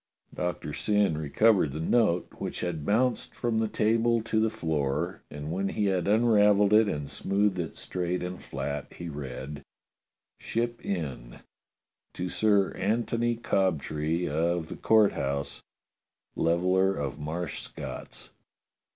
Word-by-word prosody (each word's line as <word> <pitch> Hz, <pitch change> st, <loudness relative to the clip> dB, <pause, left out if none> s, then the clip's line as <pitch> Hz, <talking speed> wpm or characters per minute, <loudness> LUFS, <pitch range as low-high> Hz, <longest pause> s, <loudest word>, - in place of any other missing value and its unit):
Doctor 90 Hz, -4 st, -3 dB
Syn 105 Hz, -4 st, +2 dB
recovered 80 Hz, +2 st, +3 dB
the 75 Hz, -, -4 dB
note, 90 Hz, 0 st, +2 dB
which -, -, -4 dB
had 85 Hz, -4 st, -3 dB
bounced 120 Hz, +4 st, +1 dB
from 115 Hz, -2 st, 0 dB
the 110 Hz, -, +1 dB
table 115 Hz, +2 st, +2 dB
to 110 Hz, -1 st, 0 dB
the 110 Hz, 0 st, +3 dB
floor, 80 Hz, -1 st, -2 dB
and 75 Hz, +1 st, -6 dB
when 95 Hz, +3 st, -1 dB
he 105 Hz, -, -1 dB
had 95 Hz, -3 st, +1 dB
unravelled 105 Hz, -2 st, +4 dB
it 110 Hz, 0 st, +6 dB
and 75 Hz, -7 st, -2 dB
smoothed 100 Hz, +2 st, 0 dB
it 80 Hz, -2 st, -4 dB
straight 90 Hz, 0 st, -2 dB
and 90 Hz, 0 st, -5 dB
flat, 70 Hz, +1 st, -4 dB
he 85 Hz, -1 st, -7 dB
read: 70 Hz, 0 st, -6 dB, 0.8 s
"Ship 120 Hz, +1 st, -2 dB
Inn. 70 Hz, -10 st, -4 dB, 0.7 s
"To 90 Hz, -, -3 dB
Sir 100 Hz, -2 st, +3 dB
Antony 115 Hz, +3 st, 0 dB
Cobtree 85 Hz, -6 st, 0 dB
of 80 Hz, +2 st, 0 dB
the -, -, -5 dB
Court 110 Hz, -2 st, +4 dB
House, 70 Hz, +1 st, -3 dB, 0.7 s
Leveller 90 Hz, +3 st, +2 dB
of 70 Hz, +1 st, -4 dB
Marsh 80 Hz, +3 st, -4 dB
Scott -, -, -7 dB
s. -, -, -11 dB
90 Hz, 135 wpm, -28 LUFS, 75-105 Hz, 0.8 s, it